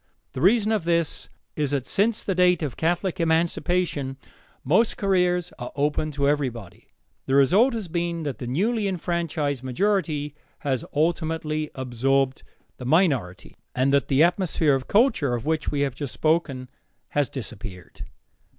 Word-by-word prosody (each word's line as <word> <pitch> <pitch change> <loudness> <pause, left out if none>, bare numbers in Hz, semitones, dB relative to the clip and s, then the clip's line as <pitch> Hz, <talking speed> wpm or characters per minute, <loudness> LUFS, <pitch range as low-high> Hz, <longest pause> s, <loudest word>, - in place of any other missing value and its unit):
The 130 - -6
reason 215 +4 +4
of 215 -5 +1
this 170 -2 0 0.3
is 150 -2 0
that 140 -2 -1
since 215 +3 +1
the 195 - -1
date 180 -2 +3
of 140 -5 -3
Catholic 175 +3 -1
emancipation, 165 -3 0 0.5
most 190 - +2
careers 180 -3 +1
are 120 - -6
open 150 +2 0
to 140 0 0
everybody. 125 -10 -2 0.4
The 135 - +1
result 200 - +4
has 215 -5 -4
been 170 0 -2
that 145 -4 -4
the 120 - -5
newly 205 - 0
enfranchised 170 -6 -2
majority 150 +1 -1 0.3
has 130 -4 -1
ultimately 155 -1 -1
absorbed 130 +1 0 0.4
the 125 - -8
minority, 130 - +1 0.2
and 130 +2 +2
that 140 - +3
the 140 +3 +4
atmosphere 170 -4 +2
of 135 -1 -1
culture, 205 - +3
of 120 - -5
which 155 -1 0
we 145 - -1
have 140 -3 0
just 140 0 -6
spoken, 155 -5 0 0.4
has 145 -4 0
disappeared. 110 - -8
155 Hz, 150 wpm, -24 LUFS, 135-180 Hz, 0.5 s, reason